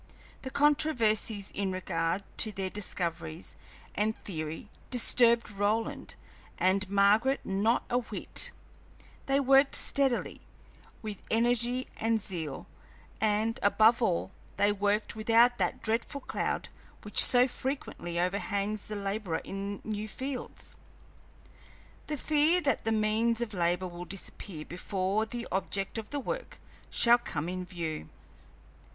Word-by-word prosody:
The 260 - -5
controversies 235 -8 +2
in 195 -1 -1
regard 180 0 -1
to 215 - +1
their 190 -2 -3
discoveries 170 - -4 0.4
and 215 +2 0
theory 160 0 -5 0.2
disturbed 235 -2 +4
Roland 205 +3 -1 0.4
and 190 +1 +2
Margaret 210 +7 +4
not 205 +5 +1
a 245 - +1
whit; 245 - +1 0.8
they 275 +1 +3
worked 275 0 +5
steadily, 270 -3 +1 0.6
with 210 -3 -6
energy 240 +2 +2
and 225 0 +1
zeal, 165 -9 -5 0.5
and, 220 +1 +1
above 220 +4 +5
all, 190 -3 0 0.3
they 205 - +4
worked 205 +2 0
without 230 +3 +4
that - - -1
dreadful 230 +5 -1
cloud - - -2 0.3
which 210 - +5
so 250 0 +6
frequently 255 -10 -4
overhangs 200 +3 -1
the 210 - -4
laborer 200 -4 -2
in 200 +1 -5
new 215 0 -3
fields 260 +4 -6 1.3
the 300 - -2
fear 310 +5 +3
that 280 -9 0
the 225 - +1
means 220 +2 +2
of 235 -3 -3
labor 175 0 0
will 175 0 -8
disappear 180 -3 -7
before 195 +4 -1
the 235 +1 -5
object 195 +3 -1
of 215 - -8
the 290 - -2
work - - -5 0.3
shall 240 0 +5
come 160 -9 -4
in 185 +1 -3
view. 165 - -5
215 Hz, 125 wpm, -30 LUFS, 190-240 Hz, 1.3 s, so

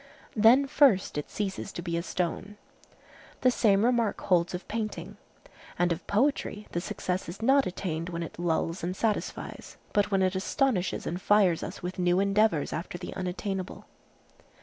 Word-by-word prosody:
Then 235 +6 +6
first 270 -8 +3
it 150 - -4
ceases 200 -1 -4
to 175 - -5
be 170 -1 -2
a 170 - 0
stone. 185 +4 -3 0.8
The 255 - +5
same 210 -3 +3
remark 235 -4 +1
holds 180 -2 +2
of 180 - -7
painting. 210 -3 -4 0.6
And 175 0 +2
of 170 +1 -3
poetry 215 -2 0
the 175 - -2
success 180 0 -3
is 175 - -8
not 270 +3 +4
attained 175 -2 -3
when 170 -1 -3
it 165 - -9
lulls 165 0 -1
and 180 +2 -2
satisfies, 215 +1 -3 0.2
but 205 -1 +2
when 195 -2 +2
it 185 - +2
astonishes 195 -1 0
and 175 +2 -3
fires 195 -5 +4
us - - -7
with 180 +1 -5
new 180 0 +3
endeavors 200 -5 +2
after 170 +2 -4
the 175 - -7
unattainable. 185 +1 -4
190 Hz, 165 wpm, -28 LUFS, 175-210 Hz, 0.8 s, Then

